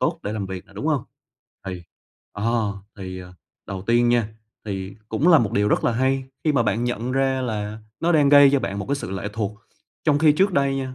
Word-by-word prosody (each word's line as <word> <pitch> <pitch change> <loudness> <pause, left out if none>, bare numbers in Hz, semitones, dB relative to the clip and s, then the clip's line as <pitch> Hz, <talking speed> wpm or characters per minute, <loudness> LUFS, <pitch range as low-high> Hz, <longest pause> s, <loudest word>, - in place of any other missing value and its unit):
tốt - - 0
để 105 - -3
làm 105 -3 -3
việc 95 -1 -7
nè, - - -19
đúng - - -5
hông? - - +1 0.6
Thì 90 -2 -5 0.5
ờ, 110 -1 0 0.2
thì, 95 -1 -6
à, 90 0 -12 0.3
đầu 95 -1 -5
tiên 120 +3 +3
nha, 120 -3 +2 0.4
thì 95 -2 -5
cũng 140 +10 +1
là 165 - +8
một 110 -4 0
điều 105 -1 +2
rất - - +1
là 120 - +3
hay 130 +2 +1 0.2
khi 155 - +3
mà 130 -5 +3
bạn 115 +2 0
nhận 120 +1 -2
ra 135 -1 +1
là 105 -2 -3 0.2
nó 170 +1 +2
đang 145 -3 +4
gây 145 -1 +8
cho 140 - +3
bạn 100 +1 -3
một - - -4
cái 140 - +1
sự 95 - -6
lệ 95 +2 -4
thuộc, 105 -1 -3 0.5
trong 145 -2 +3
khi 155 -1 +5
trước 190 +6 +2
đây 140 -4 +1
nha, 130 -1 -4
115 Hz, 235 wpm, -23 LUFS, 100-135 Hz, 0.6 s, là